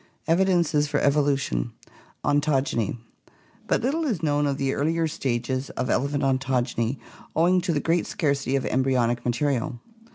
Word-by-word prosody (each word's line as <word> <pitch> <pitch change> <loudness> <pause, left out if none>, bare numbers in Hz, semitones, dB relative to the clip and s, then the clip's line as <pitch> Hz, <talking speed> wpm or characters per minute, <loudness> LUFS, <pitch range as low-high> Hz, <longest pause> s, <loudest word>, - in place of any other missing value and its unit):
EVIDENCES 170 -4 +3
FOR - - 0
EVOLUTION 140 - +1 0.5
Ontogeny 140 -7 +1 0.7
But - - +1
little 300 +6 0
is 220 - -1
known 145 -1 +2
of 140 -1 -1
the 135 -1 0
earlier 160 +3 +1
stages 130 -2 -2
of 130 - -1
elephant 140 +2 0
ontogeny 130 -2 0 0.4
owing 180 +3 +4
to 175 0 -1
the 150 - +1
great 165 +3 +1
scarcity 140 -4 0
of 135 - 0
embryonic 125 -2 +1
material. 125 -1 -1
140 Hz, 135 wpm, -25 LUFS, 130-160 Hz, 0.7 s, owing